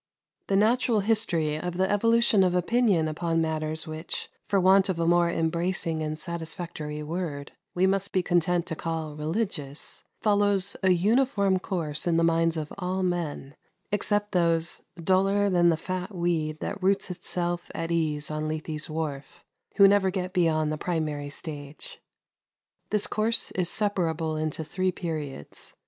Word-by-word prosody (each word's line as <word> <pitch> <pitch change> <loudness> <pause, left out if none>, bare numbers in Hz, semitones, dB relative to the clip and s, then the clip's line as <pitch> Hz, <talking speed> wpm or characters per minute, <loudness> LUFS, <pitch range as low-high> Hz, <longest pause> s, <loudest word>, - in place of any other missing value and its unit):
The 195 - +1
natural 220 +1 +3
history 185 -8 +1
of 175 +1 -4
the 190 0 +2
evolution 230 0 +3
of 180 -1 +2
opinion 190 -3 +2
upon 165 +1 -1
matters 155 -1 -1
which, 155 +1 -5 0.2
for 200 - +2
want 190 +1 +5
of 185 - 0
a 165 - 0
more 175 0 +4
embracing 170 0 0
and 155 0 -3
satisfactory 160 -2 -5
word, 150 -3 -4 0.2
we 180 +1 +3
must 195 +1 +1
be 185 - +1
content 175 0 +1
to 165 - -4
call 160 -2 -4
"religious," 155 -3 -3 0.2
follows 205 -2 +2
a 190 - +3
uniform 200 +1 +3
course 165 -5 -2
in 165 -1 +3
the 165 - +3
minds 165 0 +2
of 155 -1 -4
all 185 0 -1
men, 165 -6 -3 0.4
except 205 0 0
those 170 -2 +1 0.2
"duller 195 +2 +3
than 175 -1 +4
the 165 - +2
fat 185 +3 -5
weed 160 -3 -1
that - - -4
roots 195 0 +1
itself 175 0 -3
at 165 0 -3
ease 155 -3 0
on 155 0 -2
Lethe's 155 0 -3
wharf," 155 -3 -5 0.3
who 200 - +8
never 200 -1 +4
get 185 -1 -3
beyond 155 -3 +2
the 155 - -3
primary 155 -4 -2
stage. 145 -1 -8 0.9
This 210 -1 +2
course 220 +2 +1
is 180 -2 -1
separable 165 -7 0
into 155 0 -2
three 185 +4 -1
periods. 155 - -6
175 Hz, 155 wpm, -27 LUFS, 155-190 Hz, 0.9 s, who